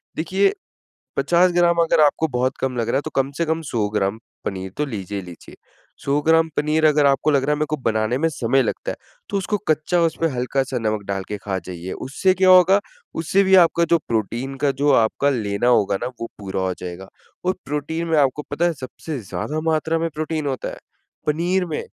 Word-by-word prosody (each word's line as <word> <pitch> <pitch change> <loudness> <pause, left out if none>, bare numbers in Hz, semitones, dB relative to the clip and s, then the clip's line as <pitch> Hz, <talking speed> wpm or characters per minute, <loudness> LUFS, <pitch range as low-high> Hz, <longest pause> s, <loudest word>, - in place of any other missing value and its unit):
देखिए 190 +5 +1 0.6
50 180 +1 +3
ग्राम 175 -1 +3
अगर 165 - +2
आपको 150 +2 +3
बहुत 130 -1 -1
कम 130 -1 -1
लग 115 -1 -1
रहा - - +1
है - - 0
तो - - -3
कम 135 0 +1
से 170 - +1
कम 160 +1 -1
100 110 -3 0
ग्राम 105 0 -1 0.3
पनीर 95 -1 -4
तो 150 - 0
लीजिए 100 -6 -5
ही 95 - -9
लीजिए। 85 -2 -12 0.5
100 140 +1 +1
ग्राम 165 +1 +4
पनीर 155 +1 +2
अगर 150 -1 +4
आपको 140 +2 +3
लग 140 -2 +2
रहा 150 +2 +1
है - - -1
मैं 155 - +1
को 155 - -1
बनाने 110 -1 0
में 165 +4 +1
समय 135 -2 +1
लगता - - -3
है, - - -6 0.3
तो - - -1
उसको 200 +2 -1
कच्चा 155 +3 +2
उसमें 165 0 +1
हल्का 125 +2 0
सा 130 -1 -4
नमक 110 -2 -1
डाल 95 -1 -2
के 105 - -4
खा 100 -1 -3
जाइए। 90 0 -7
उससे 185 +8 0
क्या 185 0 +3
होगा, 185 +2 +7 0.4
उससे 185 +5 +2
भी 190 0 +5
आपका 170 0 +1
जो 170 - +6
प्रोटीन 120 +4 -2
का 140 - +4
जो 140 +2 +1
आपका 130 +3 +3
लेना 110 -4 -1
होगा 105 -5 +3
ना - - -1
वो - - -1
पूरा 95 -2 -3
हो 95 0 0
जाएगा। 90 +1 -7 0.4
और 185 - +2
प्रोटीन 150 +4 -3
में 165 -1 +2
आपको 140 +1 +2
पता 160 +4 +1
है 175 - +2
सबसे 140 +1 -7
ज़्यादा 100 - -4
मात्रा 160 +1 0
में 165 0 -1
प्रोटीन 155 0 -2
होता 130 -2 -3
है। - - -8 0.5
पनीर 175 +5 +1
में, 160 -3 -4
140 Hz, 220 wpm, -21 LUFS, 115-165 Hz, 0.6 s, होगा